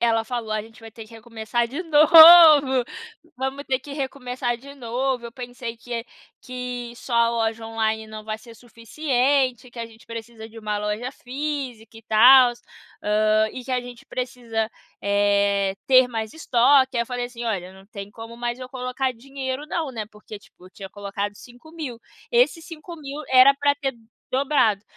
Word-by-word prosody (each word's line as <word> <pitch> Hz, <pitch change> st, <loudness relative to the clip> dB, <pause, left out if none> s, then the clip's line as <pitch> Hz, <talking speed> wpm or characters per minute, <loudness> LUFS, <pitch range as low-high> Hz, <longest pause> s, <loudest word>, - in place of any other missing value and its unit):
ela 225 Hz, -1 st, +2 dB
falou: 235 Hz, -2 st, -5 dB
"A 215 Hz, -, -1 dB
gente 225 Hz, +2 st, -14 dB
vai 225 Hz, 0 st, -11 dB
ter 225 Hz, 0 st, -11 dB
que 215 Hz, -, -19 dB
recomeçar 225 Hz, +1 st, -3 dB
de 280 Hz, +10 st, -5 dB
novo, 310 Hz, -4 st, +8 dB, 0.5 s
vamos 265 Hz, +2 st, -4 dB
ter 260 Hz, -1 st, 0 dB
que 280 Hz, +2 st, -11 dB
recomeçar 260 Hz, -3 st, -3 dB
de 280 Hz, +4 st, -13 dB
novo. 250 Hz, 0 st, -2 dB
Eu 230 Hz, -, -11 dB
pensei 245 Hz, -1 st, -7 dB
que 235 Hz, 0 st, -6 dB, 0.4 s
que 250 Hz, -1 st, -6 dB
só 245 Hz, -, -9 dB
a 235 Hz, 0 st, +4 dB
loja 225 Hz, -1 st, -2 dB
online 220 Hz, -1 st, -2 dB
não 215 Hz, 0 st, -9 dB
vai 215 Hz, 0 st, -4 dB
ser 230 Hz, +1 st, -15 dB
suficiente, 250 Hz, +2 st, -1 dB
que 240 Hz, -, -13 dB
a 230 Hz, -, -4 dB
gente 225 Hz, 0 st, -19 dB
precisa 230 Hz, -1 st, -9 dB
de 225 Hz, 0 st, -13 dB
uma 210 Hz, -1 st, -3 dB
loja 210 Hz, +5 st, -3 dB
física 260 Hz, -5 st, -6 dB
e 225 Hz, -, -13 dB
tal, 245 Hz, +3 st, +7 dB, 0.5 s
hã, 215 Hz, +1 st, +2 dB
e 255 Hz, -, -8 dB
que 265 Hz, -, -9 dB
a 250 Hz, -, +1 dB
gente 245 Hz, -1 st, -12 dB
precisa, 240 Hz, -3 st, -4 dB, 0.3 s
eh, 200 Hz, -1 st, +1 dB
ter 255 Hz, -1 st, +5 dB
mais 220 Hz, -2 st, -4 dB
estoque". 265 Hz, -2 st, +3 dB
Aí 235 Hz, -, +2 dB
eu -, -, -9 dB
falei 245 Hz, 0 st, -3 dB
assim: 240 Hz, -1 st, -8 dB
"Olha, 190 Hz, -5 st, -3 dB
não 190 Hz, 0 st, -16 dB
tem 200 Hz, -2 st, -9 dB
como 225 Hz, +2 st, -10 dB
mais 240 Hz, 0 st, -3 dB
eu 255 Hz, -1 st, -8 dB
colocar 255 Hz, +1 st, -3 dB
dinheiro 265 Hz, +3 st, -6 dB
não, 315 Hz, -2 st, -3 dB
né". 225 Hz, -4 st, -5 dB
Porque 210 Hz, 0 st, -11 dB
tipo, 185 Hz, -2 st, -19 dB
tinha 195 Hz, 0 st, -10 dB
colocado 205 Hz, 0 st, -5 dB
5.000. 255 Hz, +3 st, -10 dB, 0.3 s
Esses 475 Hz, -9 st, +2 dB
5.000, 305 Hz, -3 st, -9 dB
era 260 Hz, +2 st, +7 dB
pra 285 Hz, 0 st, +1 dB
ter 275 Hz, -2 st, -3 dB, 0.4 s
dobrado. 255 Hz, -7 st, +1 dB
240 Hz, 175 wpm, -23 LUFS, 225-265 Hz, 0.5 s, novo